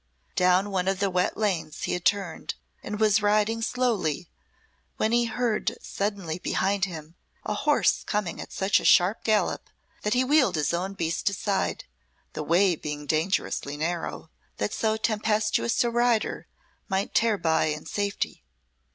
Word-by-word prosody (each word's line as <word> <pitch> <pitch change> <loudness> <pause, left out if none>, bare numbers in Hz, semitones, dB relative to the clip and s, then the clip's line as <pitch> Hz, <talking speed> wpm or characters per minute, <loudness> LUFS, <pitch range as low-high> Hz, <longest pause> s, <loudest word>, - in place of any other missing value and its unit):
Down 185 +2 +3
one 185 -1 0
of 195 -1 +1
the 200 -1 +1
wet 180 0 0
lanes 165 -8 -2
he - - -1
had 180 0 -3
turned 200 -1 0 0.3
and 210 0 -5
was 215 -1 +4
riding 210 +2 +2
slowly 225 - -1 0.7
when 220 - +1
he 240 0 +3
heard 230 -1 -1
suddenly 195 -5 -3
behind 195 +2 0
him 160 -4 -8 0.3
a - - -1
horse 290 +8 +2
coming 205 -5 -2
at - - -9
such 190 +1 +2
a - - -8
sharp 185 +4 +4
gallop 215 -2 0 0.3
that 210 +3 0
he 255 - +3
wheeled 275 - +3
his 150 +1 0
own 185 +3 -2
beast 165 +2 0
aside, 200 0 -1 0.5
the - - -4
way 175 +4 +3
being 150 -1 -6
dangerously 155 -2 -1
narrow, 165 0 -3 0.3
that 210 - -2
so 220 -1 0
tempestuous 215 +1 +1
a 240 - 0
rider 240 -1 +1 0.4
might 195 0 -1
tear 225 -2 +3
by 160 -3 +2
in 150 0 -3
safety. 205 -1 -3
200 Hz, 155 wpm, -26 LUFS, 175-215 Hz, 0.7 s, was